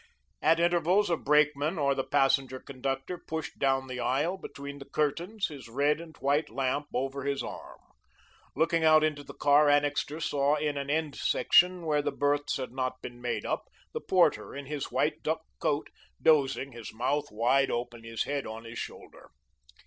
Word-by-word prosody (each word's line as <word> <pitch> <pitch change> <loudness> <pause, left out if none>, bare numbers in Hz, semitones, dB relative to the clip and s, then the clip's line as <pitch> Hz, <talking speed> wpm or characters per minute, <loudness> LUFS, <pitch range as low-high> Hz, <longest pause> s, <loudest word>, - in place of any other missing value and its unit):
At 165 +2 +4
intervals, 175 +3 +3
a - - +4
brakeman 150 0 +2
or 140 -2 +2
the 135 - -1
passenger 135 -2 +2
conductor 135 +6 -4
pushed 160 0 -6
down 135 -1 +2
the 130 -1 -6
aisle, 150 +9 0
between 140 -6 -8
the 140 - -11
curtains, 170 +8 -1
his 135 -6 -10
red 145 +6 +1
and 160 -2 -12
white 145 +3 +1
lamp 135 +2 -1
over 135 +2 -2
his 140 0 -1
arm. - - -8 0.8
Looking 165 0 +2
out 155 -1 +6
into 150 -2 0
the - - -11
car 145 +1 +5
Annixter 145 +1 +1
saw 145 -2 +1
in 150 -1 -1
an 140 0 -4
end 155 -1 0
section 180 -1 +3
where 150 -2 +2
the - - -1
berths 145 0 0
had 130 -3 -5
not 130 0 -3
been 120 0 -8
made 120 0 -2
up, - - -2 0.3
the 465 - -3
porter, 180 -6 +2
in 140 0 -6
his 145 0 -4
white - - 0
duck - - -1 0.2
coat, - - -1 0.3
dozing, 140 -3 +3
his 115 -2 -8
mouth 140 +6 -1
wide 120 +6 +2
open, 120 -1 -4
his 115 0 -2
head 140 -1 -3
on 110 +1 -7
his 115 0 -7
shoulder. - - -9
145 Hz, 180 wpm, -29 LUFS, 135-155 Hz, 0.8 s, out